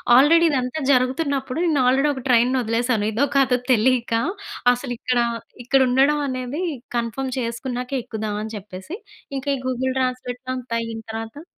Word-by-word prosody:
Already 330 Hz, +6 st, +6 dB
ఇదంతా 255 Hz, +2 st, -1 dB
జరుగుతున్నప్పుడు, 270 Hz, +2 st, +1 dB
నేను 300 Hz, -5 st, +2 dB
ఆల్రెడీ 270 Hz, +3 st, +3 dB
ఒక 260 Hz, -3 st, -7 dB
ట్రైన్‌ని 250 Hz, +2 st, +4 dB
వదిలేసాను, 230 Hz, -1 st, 0 dB
ఇదో 250 Hz, +7 st, +1 dB
కాదో 260 Hz, -2 st, +4 dB
తెలియక 245 Hz, 0 st, +2 dB, 0.6 s
అసలు. 245 Hz, 0 st, -4 dB
ఇక్కడ 250 Hz, -1 st, 0 dB, 0.5 s
,ఇక్కడ 270 Hz, +1 st, +4 dB
ఉండడం 275 Hz, +4 st, +3 dB
అనేది 255 Hz, +4 st, -3 dB, 0.4 s
కన్ఫర్మ్ 240 Hz, +3 st, -2 dB
చేసుకున్నాక 250 Hz, +2 st, -4 dB
ఎక్కుదాం, 220 Hz, -3 st, -4 dB
అని 220 Hz, +1 st, -6 dB
చెప్పేసి 195 Hz, -, -8 dB, 0.4 s
ఇంకా 270 Hz, +2 st, -4 dB
ఈ -, -, -8 dB
గూగుల్ 260 Hz, +1 st, -1 dB
ట్రాన్స్లేట్ 255 Hz, 0 st, -2 dB
అంతా 250 Hz, -2 st, -4 dB
అయిన 225 Hz, -1 st, -5 dB
తర్వాత 225 Hz, +8 st, -7 dB
255 Hz, 145 wpm, -22 LUFS, 235-270 Hz, 0.6 s, ఆల్రెడీ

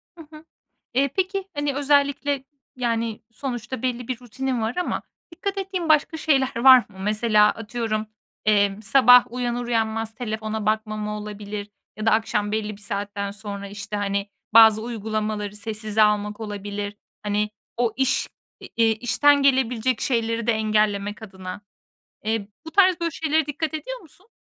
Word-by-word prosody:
Hı 330 Hz, -2 st, -12 dB
hı. 305 Hz, +1 st, -13 dB, 0.5 s
Eee, 275 Hz, +2 st, +3 dB
peki, 385 Hz, +1 st, -1 dB
hani 290 Hz, -1 st, -1 dB
özellikle 285 Hz, -1 st, +1 dB, 0.3 s
yani 230 Hz, -3 st, -1 dB
sonuçta 240 Hz, -1 st, -5 dB
belli 245 Hz, -2 st, -2 dB
bir 255 Hz, -2 st, -3 dB
rutinin 250 Hz, +1 st, -3 dB
var 225 Hz, +2 st, -2 dB
ama 360 Hz, -, -1 dB, 0.3 s
dikkat 395 Hz, +4 st, -3 dB
ettiğin 380 Hz, -3 st, -3 dB
başka 310 Hz, +1 st, +3 dB
şeyler 275 Hz, -5 st, +1 dB
var 260 Hz, +2 st, +9 dB
mı? 205 Hz, -5 st, -8 dB
Mesela 210 Hz, +1 st, +3 dB
atıyorum, 225 Hz, -1 st, -3 dB, 0.4 s
emm, 205 Hz, -1 st, +2 dB
sabah 250 Hz, +1 st, +6 dB
uyanır 245 Hz, -1 st, -2 dB
uyanmaz 225 Hz, -1 st, -1 dB
telefona 220 Hz, -2 st, -4 dB
bakmama 215 Hz, -1 st, -1 dB
olabilir 210 Hz, 0 st, -6 dB, 0.3 s
ya 215 Hz, +1 st, -4 dB
da -, -, +6 dB
akşam 210 Hz, -1 st, +1 dB
belli 215 Hz, -1 st, -2 dB
bir 205 Hz, -, -19 dB
saatten 200 Hz, 0 st, -3 dB
sonra, 200 Hz, -1 st, -7 dB
işte, 210 Hz, +1 st, -6 dB
hani 200 Hz, 0 st, -1 dB, 0.3 s
bazı 220 Hz, -1 st, +8 dB
uygulamaları 215 Hz, -2 st, -3 dB
sessize 215 Hz, 0 st, -1 dB
almak 210 Hz, 0 st, +1 dB
olabilir 205 Hz, -1 st, -5 dB, 0.3 s
hani 210 Hz, 0 st, 0 dB, 0.3 s
o 235 Hz, -2 st, +1 dB
iş, 265 Hz, 0 st, +1 dB, 0.3 s
eee, -, -, -10 dB
i 225 Hz, -1 st, +4 dB
işten 250 Hz, +6 st, +3 dB
gelebilecek 255 Hz, -3 st, +2 dB
şeyleri 230 Hz, -2 st, 0 dB
de 235 Hz, -, +4 dB
engellemek 215 Hz, -1 st, 0 dB
adına. 190 Hz, -2 st, -8 dB, 0.6 s
Eee, 220 Hz, -2 st, -1 dB, 0.2 s
bu -, -, -6 dB
tarz, 370 Hz, 0 st, +4 dB
böyle 335 Hz, -, 0 dB
şeylere 315 Hz, -1 st, 0 dB
dikkat 310 Hz, +2 st, -3 dB
ediyor -, -, -5 dB
musun? 365 Hz, +5 st, -20 dB
225 Hz, 150 wpm, -23 LUFS, 210-265 Hz, 0.6 s, var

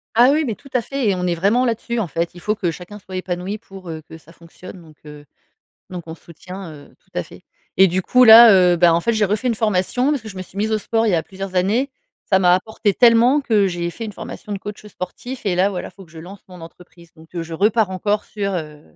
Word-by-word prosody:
Ah 245 Hz, +4 st, +6 dB
oui, 310 Hz, +2 st, +1 dB
mais 235 Hz, -7 st, -3 dB
tout 275 Hz, -, -17 dB
à 250 Hz, -, +2 dB
fait, 275 Hz, +1 st, -3 dB
et 195 Hz, -, +1 dB
on 180 Hz, 0 st, -2 dB
est 175 Hz, -, 0 dB
vraiment 205 Hz, +9 st, +2 dB
là-dessus, 235 Hz, 0 st, -2 dB
en 210 Hz, -, -1 dB
fait. 170 Hz, +2 st, -3 dB
Il 175 Hz, -, -12 dB
faut 210 Hz, +3 st, -1 dB
que 180 Hz, -5 st, -2 dB
chacun 180 Hz, +6 st, -10 dB
soit 190 Hz, -1 st, -11 dB
épanoui 185 Hz, +2 st, -4 dB
pour, 195 Hz, -4 st, -12 dB
heu, 160 Hz, -1 st, -6 dB
que 160 Hz, +1 st, -13 dB
ça 165 Hz, +1 st, -19 dB
fonctionne, 175 Hz, +2 st, -13 dB
donc 155 Hz, -3 st, -18 dB
heu, 150 Hz, -1 st, -12 dB, 0.7 s
donc 180 Hz, -2 st, -7 dB
on 160 Hz, -, -7 dB
se -, -, -23 dB
soutient, 180 Hz, +2 st, -10 dB
heu, 145 Hz, -2 st, -15 dB
tout -, -, -37 dB
à -, -, -1 dB
fait, -, -, -15 dB, 0.3 s
et 190 Hz, -, +7 dB
du 185 Hz, +1 st, 0 dB
coup, 250 Hz, +7 st, +4 dB
là, 230 Hz, 0 st, +10 dB, 0.2 s
heu, -, -, +1 dB
ben 170 Hz, 0 st, +5 dB
en 165 Hz, -, +2 dB
fait, 235 Hz, -, 0 dB
j'ai 215 Hz, -1 st, +1 dB
refait 210 Hz, +5 st, -2 dB
une 235 Hz, -, +1 dB
formation, 215 Hz, +4 st, 0 dB
parce 285 Hz, -6 st, -1 dB
que 220 Hz, -, -9 dB
je 190 Hz, -, -12 dB
me -, -, -4 dB
suis 185 Hz, -, -17 dB
mise 215 Hz, +2 st, -1 dB
au 215 Hz, -, +1 dB
sport 225 Hz, +2 st, -1 dB
il -, -, +2 dB
y -, -, +2 dB
a 165 Hz, -, +1 dB
plusieurs 195 Hz, +1 st, -8 dB
années. 210 Hz, +10 st, +1 dB, 0.3 s
Ça 190 Hz, -, +2 dB
m'a 180 Hz, -1 st, +4 dB
apporté 205 Hz, +2 st, -1 dB
tellement 240 Hz, +4 st, +4 dB
que 215 Hz, -6 st, +2 dB
j'ai 175 Hz, -2 st, -3 dB
fait 225 Hz, +6 st, -7 dB
une 210 Hz, -, -7 dB
formation 210 Hz, -, -9 dB
de 200 Hz, -, -3 dB
coach 210 Hz, +1 st, -9 dB
sportif, 210 Hz, +6 st, -8 dB
et 195 Hz, -4 st, 0 dB
là, 185 Hz, +2 st, +2 dB
voilà, 190 Hz, -3 st, -6 dB
faut 195 Hz, -, -15 dB
que 165 Hz, -, -23 dB
je 160 Hz, -, -13 dB
lance 185 Hz, +4 st, -11 dB
mon 180 Hz, -2 st, -13 dB
entreprise. 170 Hz, 0 st, -15 dB
Donc, 160 Hz, +2 st, -19 dB
heu, 170 Hz, -, -3 dB
je 165 Hz, 0 st, -10 dB
repars 210 Hz, +4 st, +1 dB
encore 205 Hz, +3 st, -1 dB
sur, 200 Hz, -2 st, -4 dB
heu, 150 Hz, -3 st, -6 dB
190 Hz, 275 wpm, -20 LUFS, 175-220 Hz, 0.7 s, là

